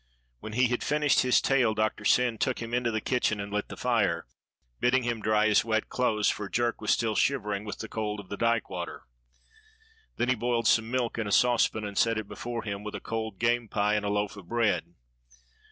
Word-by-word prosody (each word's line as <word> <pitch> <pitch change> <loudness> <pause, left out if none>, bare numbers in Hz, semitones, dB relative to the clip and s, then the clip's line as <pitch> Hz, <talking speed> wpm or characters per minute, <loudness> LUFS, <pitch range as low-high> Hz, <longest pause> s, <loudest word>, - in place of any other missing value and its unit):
When 110 - -8
he 125 +1 +3
had 120 - -1
finished 150 -1 +2
his 125 -1 +4
tale 125 -5 +2
Doctor 110 0 -1
Syn 120 -3 +3
took 130 - 0
him 115 0 -6
into 120 -1 +1
the 110 -1 -1
kitchen 120 -4 0
and 100 0 -5
lit 105 0 -1
the - - -9
fire, 105 -9 +1 0.5
bidding 125 +1 +2
him 120 -2 -2
dry 110 0 +2
his 105 -1 +4
wet 110 -1 -1
clothes, 110 -4 +1
for 100 -2 -1
Jerk 120 +1 -1
was 110 - -3
still 115 -2 +2
shivering 105 -7 0
with 105 -3 -6
the 110 - -6
cold 105 -1 -3
of 100 - -10
the 100 - -5
dyke 115 +1 +1
water. 90 -2 -6 1.1
Then 120 - 0
he - - +5
boiled 120 -1 0
some 110 0 +3
milk 120 -2 -1
in 110 - -2
a - - -3
saucepan 115 -2 +3
and 100 -1 -3
set 115 -1 +2
it 110 -2 -4
before 120 +1 -5
him, 100 -1 -5
with 105 - -6
a - - -4
cold 110 -2 -4
game 120 +1 +1
pie 105 0 +1
and 105 -1 0
a 100 - -1
loaf 105 0 -1
of 100 -4 -12
bread. 90 -7 0
110 Hz, 220 wpm, -28 LUFS, 105-120 Hz, 1.1 s, he